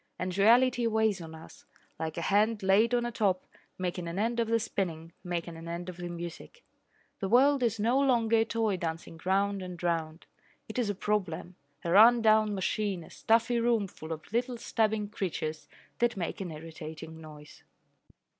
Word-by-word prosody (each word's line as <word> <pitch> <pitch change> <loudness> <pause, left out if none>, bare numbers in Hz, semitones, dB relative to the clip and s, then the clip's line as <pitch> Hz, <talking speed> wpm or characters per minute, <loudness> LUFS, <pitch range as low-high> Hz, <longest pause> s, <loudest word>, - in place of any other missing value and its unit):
And 180 0 -3
reality 240 +4 +4
weighs 220 -4 +1
on 160 -1 -9
us, 160 - -13 0.4
like 160 0 -4
a 170 - -2
hand 210 +2 +2
laid 215 +5 +4
on 240 0 +1
a 240 - -2
top, 200 -5 0 0.3
making 180 -1 -3
an 170 +2 -5
end 230 +3 0
of 230 - +1
the 230 0 +2
spinning, 170 -6 -3
making 170 -1 -4
an 165 +1 -9
end 170 +2 -5
of 180 - -8
the 175 0 -5
music. 175 - -8 0.6
The 195 - -2
world 270 +4 +5
is 225 -3 +1
no 235 +5 +2
longer 235 -5 +3
a 225 - +3
toy 225 -3 0
dancing 165 -1 -5
round 200 +1 +1
and 180 -1 -7
round. 165 -1 -2 0.4
It - - -4
is 230 -4 0
a 205 - -1
problem, 185 -4 -2 0.3
a 170 - 0
run 230 +5 +7
down 215 -1 +4
machine, 195 -1 -1
a - - -15
stuffy 230 +1 +2
room 230 -3 +2
full 160 -3 -10
of 160 +5 -7
little 245 +1 0
stabbing 220 -2 0
creatures 160 -7 -4 0.3
that 240 -2 +1
make 185 +3 -3
an 185 - -4
irritating 160 0 -9
noise. 150 -1 -13
200 Hz, 185 wpm, -30 LUFS, 170-225 Hz, 0.6 s, run